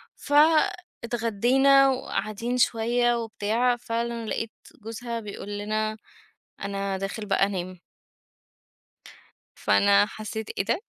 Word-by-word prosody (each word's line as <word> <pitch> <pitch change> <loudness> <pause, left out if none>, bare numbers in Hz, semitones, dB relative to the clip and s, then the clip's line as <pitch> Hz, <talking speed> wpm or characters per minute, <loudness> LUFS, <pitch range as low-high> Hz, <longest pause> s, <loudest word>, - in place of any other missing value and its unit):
فاتغدينا 275 - +3
وقاعدين 235 -1 -2
شويّة 240 +1 +2
وبتاع، 230 +2 0
فعلًا 235 0 -3
لَقيت 225 0 -3 0.3
جوزها 230 +1 -5
بيقول 205 -1 -7
لنا: 215 +1 -2 0.6
"أنا 200 -1 -2
داخل 195 +3 -4
بقى 195 -1 +2
أنام." 185 -2 -5 1.8
فأنا 200 0 +4
حسيت 215 0 -6
إيه 195 - +1
ده! 230 - 0
225 Hz, 95 wpm, -26 LUFS, 205-240 Hz, 1.8 s, فأنا